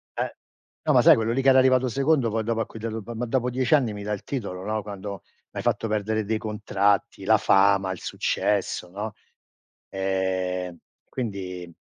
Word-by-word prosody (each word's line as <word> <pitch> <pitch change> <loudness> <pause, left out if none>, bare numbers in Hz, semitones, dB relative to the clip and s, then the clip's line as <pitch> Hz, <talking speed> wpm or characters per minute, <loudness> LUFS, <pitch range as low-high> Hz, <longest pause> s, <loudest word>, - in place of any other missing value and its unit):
eh, - - -3 0.5
no, - - +3
ma - - +6
sai - - +8
quello 115 +1 0
lì 135 - +1
che 135 - +4
era 130 - +7
arrivato 130 -1 +4
secondo 135 -1 +2
poi 110 +1 -1
dopo 115 0 0
a 110 - -1
cui 110 - -11
dato 110 -1 -4
"M 120 -1 -7
ma 125 - -2
dopo 125 +1 0
10 125 +3 +2
anni 130 -7 +1
mi 105 0 -7
dai 105 +1 -1
il 100 - -12
titolo, 100 -9 -4
no, 110 +2 -2
quando 100 -1 -7 0.3
m'hai - - -5
fatto 115 - 0
perdere 110 +1 0
dei 110 +1 0
contratti, 105 -2 0
la - - +5
fama, 95 -1 +3
il 95 - -5
successo," 100 -3 -1
no, 105 +2 -5 0.8
ehm, 95 -2 -2 0.3
quindi 95 -7 -5
105 Hz, 195 wpm, -25 LUFS, 95-115 Hz, 0.8 s, sai